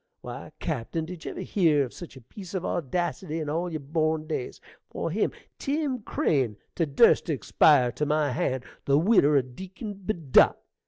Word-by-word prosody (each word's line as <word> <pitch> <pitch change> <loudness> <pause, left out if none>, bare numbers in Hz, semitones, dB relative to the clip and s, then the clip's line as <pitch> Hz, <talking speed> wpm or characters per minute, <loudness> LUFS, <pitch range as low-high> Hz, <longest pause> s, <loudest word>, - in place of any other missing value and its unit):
Why, - - -8
cappen, 160 +8 -3
did 175 -1 -9
ye - - -3
ever - - -6
hear 160 -7 +2
of 125 - -11
such 170 -6 -10
a - - -12
piece 185 - -10
of 185 - -2
audacity 175 +1 -2
in 155 -2 -3
all 170 +3 -1
yer 160 - -2
born 155 +2 -1
days? 155 -5 -4 0.3
for - - -3
him - - +1 0.3
Tim 280 -3 -1
Crane 130 - 0 0.2
to 165 - 0
durst 165 +11 +4
to 160 - +1
expire 130 +1 +4
to 150 +4 -2
my 150 -1 +1
hand, 130 +1 -1 0.2
the 140 0 +4
widder 155 -5 +4
o' 135 - +3
Deacon 190 - -8
Bedott! 180 - +3
155 Hz, 180 wpm, -27 LUFS, 140-180 Hz, 0.3 s, durst